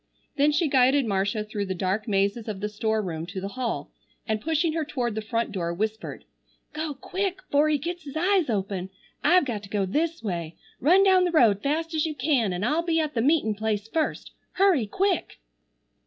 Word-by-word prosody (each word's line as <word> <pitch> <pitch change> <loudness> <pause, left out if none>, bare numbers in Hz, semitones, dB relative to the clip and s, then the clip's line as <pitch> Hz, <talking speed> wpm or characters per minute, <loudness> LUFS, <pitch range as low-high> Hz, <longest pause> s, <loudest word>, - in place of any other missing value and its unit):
Then 290 +1 +4
she 305 +2 +2
guided 270 0 +4
Marcia 205 +1 0
through 210 -2 -4
the 190 - -2
dark 190 +5 -1
mazes 200 +2 0
of 210 -3 -4
the 210 +1 -2
store 220 +1 -1
room 165 -3 -4
to 190 +1 -5
the 195 +1 -4
hall, 245 +1 -3 0.4
and 215 -2 -1
pushing 320 +2 +1
her 325 -1 0
toward 250 -6 -2
the 220 - -3
front 230 +2 -2
door, 175 -4 -2
whispered: 215 +3 -4 0.5
"Go 310 -1 -3
quick 375 +6 -3
'fore 290 +2 +4
he 300 - +3
gets 345 +5 -5
his 280 +1 -6
eyes 365 -2 +2
open. 195 -3 -2 0.3
I've 360 -2 +5
got 230 -6 -3
to 200 - -12
go 200 -1 0
this 320 - -1
way. 170 -5 -3 0.2
Run 360 +8 +5
down 375 -2 +5
the 355 - +1
road 225 - +4
fast 320 +4 -1
as 315 0 +1
you 310 - -4
can 255 -6 +1
an' 180 +2 -3
I'll 300 +9 +2
be 335 -1 +1
at 310 -1 -1
the 230 - 0
meetin' 280 -4 +2
place 215 0 -2
first. 315 +6 -2 0.2
Hurry, 365 - +3
quick!" 375 - -1
245 Hz, 205 wpm, -26 LUFS, 205-315 Hz, 0.5 s, I've